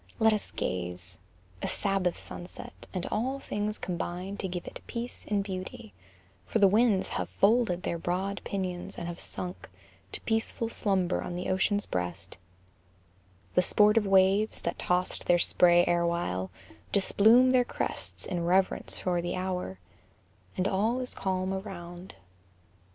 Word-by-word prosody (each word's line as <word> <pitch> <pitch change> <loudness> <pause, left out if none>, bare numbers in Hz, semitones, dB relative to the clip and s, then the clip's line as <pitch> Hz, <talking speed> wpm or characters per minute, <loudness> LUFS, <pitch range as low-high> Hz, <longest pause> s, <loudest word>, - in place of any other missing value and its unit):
Let 220 -1 +5
us 210 - -2
gaze: 90 0 -4 0.4
A - - -1
Sabbath 195 -3 0
sunset; 175 - -9
and 185 -2 -3
all 260 +5 -1
things 210 -3 -2
combine 180 +2 -4
To 195 - -2
give 180 -1 -5
it - - -8
peace 240 0 -5
and 205 -1 +1
beauty; 185 - -6 0.5
for - - +1
the 205 -3 +7
winds 210 -1 +3
Have 90 -1 -3
folded 185 - +2
their 170 - -2
broad 190 +4 -2
pinions, 185 -3 -4
and 170 - -4
have 175 0 -6
sunk 180 0 -6 0.4
To - - -2
peaceful 225 0 0
slumber 190 -5 +1
on 175 - -5
the 180 +1 -2
ocean's 200 +2 +1
breast 90 0 -4 1.1
The 180 - +5
sportive 210 +3 +4
waves, 195 +2 +3
that - - -2
tossed 180 0 0
their 175 - +6
spray 175 0 +5
erewhile, 170 - 0 0.4
Displume 225 +6 +5
their 255 -1 +5
crests - - -4
in 175 -2 -2
reverence 185 +2 +2
for 175 -1 0
the 175 - -2
hour, 185 - -3 0.8
And 185 - +1
all 220 +7 +1
is 250 -1 -4
calm 190 0 -1
around. 180 - -7
185 Hz, 145 wpm, -29 LUFS, 175-205 Hz, 1.1 s, the